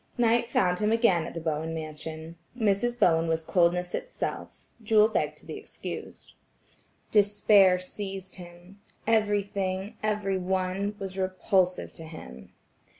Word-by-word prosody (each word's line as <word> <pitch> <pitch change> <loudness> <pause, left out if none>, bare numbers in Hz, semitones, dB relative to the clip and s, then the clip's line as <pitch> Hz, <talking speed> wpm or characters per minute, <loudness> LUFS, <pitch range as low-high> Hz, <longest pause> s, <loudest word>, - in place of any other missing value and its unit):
Night 235 0 +3
found 180 -5 +2
him 210 0 +1
again 200 -8 +3
at - - -9
the - - -2
Bowen 160 0 -2
mansion. 160 +1 -7 0.2
Mrs. 225 +2 +1
Bowen 165 -1 +4
was 160 0 0
coldness 180 +1 +2
itself; - - -5 0.2
Jewel 215 -1 +5
begged 220 - -1
to - - -15
be - - -6
excused. - - -8 0.8
Despair 205 -2 +5
seized 190 0 -7
him. 175 +2 -13 0.2
Everything, 205 -3 0
every 210 -3 0
one, 190 +2 -1
was 195 -1 -6
repulsive 185 0 0
to 165 - -10
him. 65 - -11
190 Hz, 130 wpm, -28 LUFS, 175-210 Hz, 0.8 s, Jewel